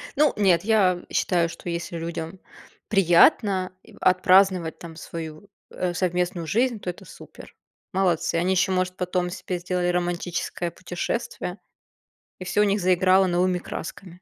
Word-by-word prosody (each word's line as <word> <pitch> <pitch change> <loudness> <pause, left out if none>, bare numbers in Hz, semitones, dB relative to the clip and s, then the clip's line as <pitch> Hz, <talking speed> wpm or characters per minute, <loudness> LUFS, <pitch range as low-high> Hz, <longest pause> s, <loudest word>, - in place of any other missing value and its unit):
Ну, 295 -1 +3
нет, 190 -4 +3
я 195 -5 +3
считаю, 170 -2 +1
что 170 +1 -8
если 170 0 -4
людям 165 +2 -5 0.5
приятно, 190 - +4
и - - -17
отпраздновать, 185 -2 +3
там, 165 -2 -10
свою, 160 +3 -8 0.2
э, 180 -1 -2
совместную 180 -2 -1
жизнь, 235 +5 +1
то- 180 - -5
это 175 - -8
супер. - - -14 0.4
Молодцы. 175 -4 +1
Они 175 +3 +1
еще, 190 +1 +2
может, 185 0 0
потом 180 -1 -1
себе 180 -1 -5
сделали 180 0 -1
романтическое 175 -1 -2
путешествие, 180 +2 -4 0.8
и 185 - -7
всё 205 - 0
у - - +5
них 200 0 +1
заиграло 185 +1 +4
новыми 180 +1 +1
красками. 180 +2 -7
180 Hz, 145 wpm, -24 LUFS, 175-190 Hz, 0.8 s, у